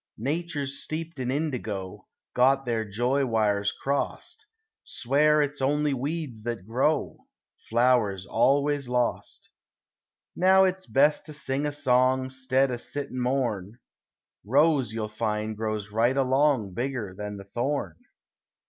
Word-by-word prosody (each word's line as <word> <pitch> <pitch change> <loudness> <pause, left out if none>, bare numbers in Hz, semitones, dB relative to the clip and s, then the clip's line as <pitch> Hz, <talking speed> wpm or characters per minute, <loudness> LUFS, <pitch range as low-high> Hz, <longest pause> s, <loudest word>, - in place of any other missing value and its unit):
Natures 145 +1 -3
steeped 165 -1 -6
in 125 -1 -2
indigo; 125 -10 -3 0.3
Got 135 +2 +3
their 115 -2 0
joy 120 +7 0
wires 105 -4 +1
crossed; 140 - -3 0.4
Swear 150 +4 +2
it's 145 -1 -4
only 145 +2 +1
weeds 140 -3 -4
that 115 -4 -4
grow; 130 +7 -1 0.4
Flowers 115 -5 +2
always 140 +5 +2
lost. 125 -1 -2 0.8
Now 190 +1 +5
it's 190 0 -1
best 145 +4 +2
to 155 - -6
sing 145 0 -2
a - - -2
song 130 -2 +2
'Stead 130 +1 +1
o' 120 - -2
sit 140 +4 -5
and 130 - -3
mourn; 120 -5 -1 0.7
Rose 135 +1 +3
you'll 110 -1 -3
find 110 0 -2
grows 110 -1 -3
right 120 +5 +2
along 135 -6 +2
Bigger 120 -4 -3
than 105 0 -6
the 100 - -9
thorn. 120 - -2
130 Hz, 130 wpm, -26 LUFS, 110-145 Hz, 0.8 s, Now